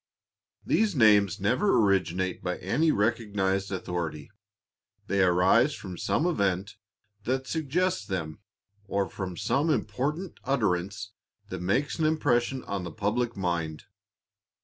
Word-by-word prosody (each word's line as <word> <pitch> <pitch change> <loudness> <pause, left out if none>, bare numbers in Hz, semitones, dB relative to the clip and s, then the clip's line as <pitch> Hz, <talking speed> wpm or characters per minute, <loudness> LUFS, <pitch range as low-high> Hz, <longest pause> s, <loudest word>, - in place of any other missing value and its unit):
These 215 -4 +2
names 105 -4 +5
never 150 - +2
originate 95 -3 +1
by - - -2
any 155 +6 +1
recognized 100 -4 0
authority. 85 -5 -4 0.7
They 100 0 +1
arise 95 +10 +4
from 95 -3 -8
some 155 - 0
event 100 - 0 0.5
that 130 +2 -1
suggests 165 +6 0
them, 90 -6 -4 0.5
or 100 -1 0
from 90 -2 -6
some 145 - +1
important 155 +5 -2
utterance 100 -5 -1 0.4
that 95 -2 -5
makes 125 - 0
an 160 - +2
impression 130 -4 +1
on 100 -2 -4
the 85 - -6
public 115 +3 -1
mind. 85 -4 -2
100 Hz, 120 wpm, -27 LUFS, 95-135 Hz, 0.7 s, names